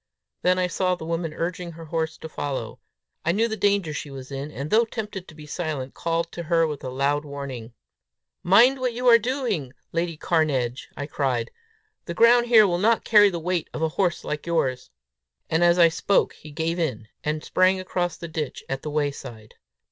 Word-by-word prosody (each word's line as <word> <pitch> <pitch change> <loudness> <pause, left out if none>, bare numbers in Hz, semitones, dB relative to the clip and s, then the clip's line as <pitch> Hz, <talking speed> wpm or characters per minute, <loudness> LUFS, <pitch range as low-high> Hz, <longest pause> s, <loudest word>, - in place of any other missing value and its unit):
Then 180 0 +3
I 185 - +2
saw 185 +1 0
the 165 - -8
woman 165 0 -2
urging 170 +2 -4
her 165 0 -10
horse 160 0 -2
to - - -8
follow. 140 -6 -4 0.4
I 170 - +2
knew 220 +6 +2
the 220 - -3
danger 200 -6 +1
she 150 - -5
was 135 -1 -9
in, 140 +2 -4
and, 150 0 -6
though 225 +2 +5
tempted 210 -5 -6
to 160 - -13
be 150 -1 -11
silent, 150 -4 -4
called 165 0 -2
to 170 - -6
her 165 0 +2
with 150 -3 -5
a 130 - -4
loud 140 +3 0
warning. 135 -5 -7 0.7
"Mind 240 +9 +5
what 250 -2 -1
you 250 +2 -2
are 235 -1 +8
doing, 225 - -2 0.2
Lady 165 -1 -2
Cairnedge!" 140 -7 0
I 145 - -3
cried. 130 -5 -1 0.5
"The 170 - -5
ground 240 +3 +5
here 225 -3 +7
will 175 -3 0
not 225 +4 +2
carry 210 -2 +7
the 175 - -4
weight 170 0 -2
of 155 - -2
a 160 - +2
horse 175 +1 0
like 150 +2 -4
yours." 130 -7 0 0.6
But 160 - +2
as 175 0 +5
I 170 -1 +7
spoke 195 +4 +1
he 155 - -13
gave 160 +3 -2
in, 125 -10 -2 0.2
and 150 0 -2
sprang 185 +1 +3
across 180 -2 -2
the 170 - -7
ditch 155 -3 -4
at 135 0 -3
the 150 - -5
way 145 -1 0
side. 110 -5 -11
165 Hz, 205 wpm, -24 LUFS, 145-185 Hz, 0.7 s, are